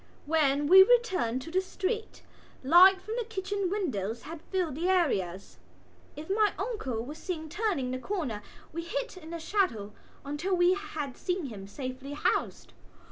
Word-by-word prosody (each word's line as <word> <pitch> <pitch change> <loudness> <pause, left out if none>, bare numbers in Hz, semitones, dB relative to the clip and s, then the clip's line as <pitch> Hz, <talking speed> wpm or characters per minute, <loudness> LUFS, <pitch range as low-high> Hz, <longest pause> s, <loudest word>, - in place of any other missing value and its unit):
When 290 -2 +2
we 375 +5 +9
returned 380 - +3
to 325 - -9
the 375 +2 +2
street 410 +4 -4 0.4
light 365 +7 +7
from 435 +5 -5
the 485 - 0
kitchen 400 -3 -3
windows 235 - -2
had 320 0 -8
filled 365 -6 0
the 335 +6 -1
areas. 195 - 0 0.6
If 300 +2 -8
my 415 +1 +2
uncle 270 - -3
was 295 +4 -8
seen 320 -4 -5
turning 350 - -1
the 255 - -3
corner 275 - -3 0.3
we 335 - -3
hid - - -4
in 325 -3 -11
the 335 - -4
shadow 320 - -1 0.3
until 300 +7 -1
we 355 +1 +4
had 370 -10 -5
seen 360 -3 -2
him 205 -7 -8
safely 255 +4 -6
housed. 295 - -1
335 Hz, 160 wpm, -29 LUFS, 270-385 Hz, 0.6 s, we